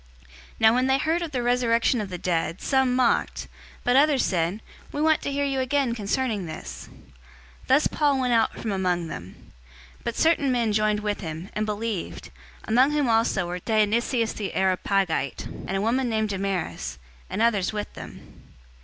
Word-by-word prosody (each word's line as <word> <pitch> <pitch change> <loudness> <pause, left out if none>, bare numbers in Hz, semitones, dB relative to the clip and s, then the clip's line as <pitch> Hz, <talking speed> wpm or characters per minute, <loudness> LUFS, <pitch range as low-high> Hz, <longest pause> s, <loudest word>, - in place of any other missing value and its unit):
017:032 65 - -25 0.3
Now 220 0 +7
when 255 +2 +2
they 265 0 +3
heard 320 +4 0
of 340 - -3
the 255 -4 -2
resurrection 240 -1 +2
of 200 - -5
the 180 - -5
dead, 170 0 -1
some 265 -2 +2
mocked; 250 -2 +1 0.4
but 245 - +2
others 285 -1 +4
said, 180 +3 -1 0.3
"We - - -4
want 315 0 +3
to 280 - -3
hear 285 0 0
you 270 -1 -1
again 260 -1 +1
concerning 215 -2 -1
this." 155 - -8
017:033 - - -19 0.6
Thus 275 +4 +4
Paul 290 -3 +2
went 250 -2 +1
out 225 -1 +2
from 220 - -3
among 180 -3 0
them. 85 - -10 0.5
017:034 - - -25
But 235 - -2
certain 315 -4 +3
men 235 -4 +1
joined 210 0 +1
with 210 0 -2
him, 160 +1 -6
and 215 0 -1
believed, 210 -2 -4 0.3
among 255 +6 +3
whom 295 -3 +1
also 225 -5 +2
was 180 +1 -4
Dionysius 225 +2 +1
the 205 -3 -5
Areopagite, 190 -5 0 0.2
and 195 - -1
a - - -1
woman 245 +4 +1
named 220 -1 0
Damaris, 190 - -3 0.3
and - - -3
others 220 -5 +2
with 210 -1 -5
them. - - -12
225 Hz, 180 wpm, -25 LUFS, 195-260 Hz, 0.6 s, Now